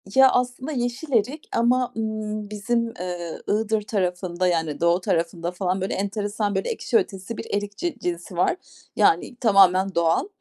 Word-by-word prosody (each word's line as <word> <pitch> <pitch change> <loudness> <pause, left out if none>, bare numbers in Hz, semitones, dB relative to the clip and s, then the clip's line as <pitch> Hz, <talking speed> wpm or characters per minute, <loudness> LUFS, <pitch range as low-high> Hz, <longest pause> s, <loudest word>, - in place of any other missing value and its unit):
Ya, 265 0 +8
aslında 250 +4 -1
yeşil 255 +3 -3
erik 255 +7 0
ama, 245 +2 +2
ımm, 215 -1 -3
bizim, 230 +2 -1
eee, 175 -2 -5
Iğdır 215 0 +1
tarafında, 185 -3 -1
yani, 160 -4 0
doğu 170 +2 +3
tarafında 170 0 -1
falan, 185 +1 -1
böyle, 190 - -1
enteresan, 205 +1 -2
böyle, 190 - -1
ekşi 455 0 +1
ötesi 210 - -3
bir - - -5
erik 205 0 -2
ci 345 -6 -2
cinsi 175 +1 -4
var. 180 - +3 0.4
Yani, 245 - +3
tamamen 195 -4 +4
doğal. 170 - +2
205 Hz, 155 wpm, -24 LUFS, 180-235 Hz, 0.4 s, Ya